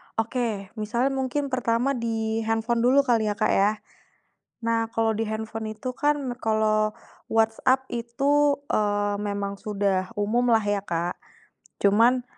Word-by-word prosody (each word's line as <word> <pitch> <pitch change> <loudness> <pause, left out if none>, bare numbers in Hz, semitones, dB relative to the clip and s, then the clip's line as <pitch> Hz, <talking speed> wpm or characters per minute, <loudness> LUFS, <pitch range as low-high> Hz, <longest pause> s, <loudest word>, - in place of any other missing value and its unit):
Oke, 225 -4 -2
misalnya 235 +5 0
mungkin 270 +1 -2
pertama 245 +1 +1
di 225 -3 -1
handphone 225 +1 0
dulu 255 +4 +4
kali 230 -5 +2
ya 205 - 0
Kak 215 0 +1
ya. 200 +2 +4 0.9
Nah 230 0 +1
kalau 225 0 +2
di 225 - 0
handphone 220 0 -4
itu 235 +4 -5
kan 290 -3 +1
kalau 215 -1 +1 0.4
WhatsApp 225 +4 +2
itu, 280 +5 +1
eee, 205 -1 +1
memang 200 -1 -3
sudah 195 -2 -1
umum 230 +3 +1
lah 225 - +4
ya 205 -1 0
Kak. 170 0 -2 0.7
Cuman 230 +5 +4
225 Hz, 135 wpm, -25 LUFS, 210-245 Hz, 0.9 s, dulu